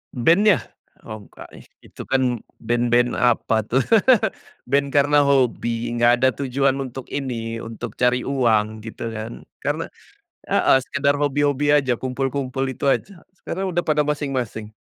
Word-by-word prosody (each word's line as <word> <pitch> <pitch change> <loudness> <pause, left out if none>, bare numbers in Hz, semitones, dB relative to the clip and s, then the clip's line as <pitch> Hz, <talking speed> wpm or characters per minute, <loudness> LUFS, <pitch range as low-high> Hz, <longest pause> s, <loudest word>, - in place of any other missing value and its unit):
Band-nya? 170 - +4 0.4
Oh 110 -2 -9
nggak, - - -13 0.4
itu - - -11
kan 125 -3 +1 0.2
band-band 120 +1 +1
apa 115 -2 +2
tuh, 130 - +2 0.9
band 140 +2 +1
karena 145 +1 +3
hobi, 120 -4 +1
nggak 120 0 +4
ada 130 +2 +3
tujuan 135 0 0
untuk 130 -1 -7
ini, 115 -5 -4
untuk 115 0 -7
cari 125 0 +2
uang, 110 -5 +1
gitu 115 +1 -6
kan. 110 +1 -7 0.2
Karena, - - -2 0.6
heeh, - - +3
sekedar 140 +2 0
hobi-hobi 145 0 +1
aja, 135 -4 +3
kumpul-kumpul 135 +1 -2
itu 130 - -7
aja, 190 +2 -3 0.2
sekarang 190 +1 -4
udah 175 - 0
pada 150 -1 +2
masing-masing. 130 -7 -3
130 Hz, 135 wpm, -22 LUFS, 120-140 Hz, 0.9 s, Band-nya